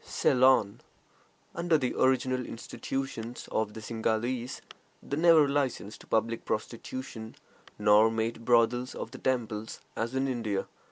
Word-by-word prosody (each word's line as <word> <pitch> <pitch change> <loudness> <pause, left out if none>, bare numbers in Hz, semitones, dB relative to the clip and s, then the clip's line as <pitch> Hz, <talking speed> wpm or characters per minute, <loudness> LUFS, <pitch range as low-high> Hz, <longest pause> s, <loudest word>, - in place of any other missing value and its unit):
CEYLON. 125 -5 +3 0.7
Under 170 -1 +2
the 130 -4 -1
original 130 -1 +2
institutions 120 0 -5
of 110 -1 -1
the 110 - -7
Singhalese, 115 +3 -2 0.4
they 140 - -3
never 160 -2 +6
licensed 135 -7 -2
public 115 +1 0
prostitution, 115 0 -5 0.4
nor 105 +1 +5
made 115 +1 -2
brothels 120 +1 +2
of - - -6
the - - -9
temples, 110 -4 -2 0.2
as 115 +3 -3
in 135 +1 +1
India. 115 -6 -2
120 Hz, 120 wpm, -29 LUFS, 110-130 Hz, 0.7 s, never